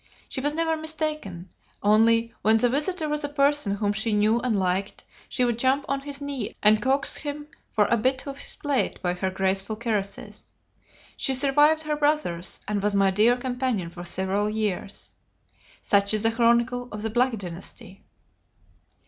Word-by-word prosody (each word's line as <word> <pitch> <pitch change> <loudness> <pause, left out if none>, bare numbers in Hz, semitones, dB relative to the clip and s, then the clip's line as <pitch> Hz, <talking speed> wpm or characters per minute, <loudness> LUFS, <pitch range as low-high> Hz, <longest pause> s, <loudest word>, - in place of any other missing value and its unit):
She 260 - -5
was 290 +2 0
never 325 0 +1
mistaken: 305 - -4 0.3
only, 230 +2 +4
when 220 +1 +4
the 245 +2 +2
visitor 310 +5 -1
was 300 0 -2
a 290 - -2
person 285 -7 +2
whom 205 0 0
she 215 +1 -1
knew 215 +3 +3
and 235 -4 0
liked, 190 +1 -1 0.3
she 250 - +1
would 240 -1 -1
jump 265 +3 +2
on 275 0 0
his 285 0 -4
knee 280 -6 -4
and 210 0 +5
coax 270 +3 +1
him 295 0 -5 0.3
for 210 - +4
a 235 - +2
bit 260 +4 0
off 275 -1 -7
his - - -4
plate 285 -3 -1
by 175 -1 +1
her 185 +1 -2
graceful 195 +2 -1
caresses. 210 -3 -4 0.6
She 265 - 0
survived 295 +4 +4
her 305 -1 -1
brothers, 290 - 0
and 205 -1 -1
was 205 0 0
my 195 -1 +4
dear 220 +6 +4
companion 245 -8 -2
for 175 0 -8
several 190 +3 -1
years.... 210 -2 -3 0.7
Such 200 +1 +2
is 215 - 0
the 225 - +3
chronicle 235 +1 +2
of 210 0 -5
the 225 - -2
Black 245 +1 +2
Dynasty." 185 +1 -8
230 Hz, 175 wpm, -25 LUFS, 205-280 Hz, 0.7 s, and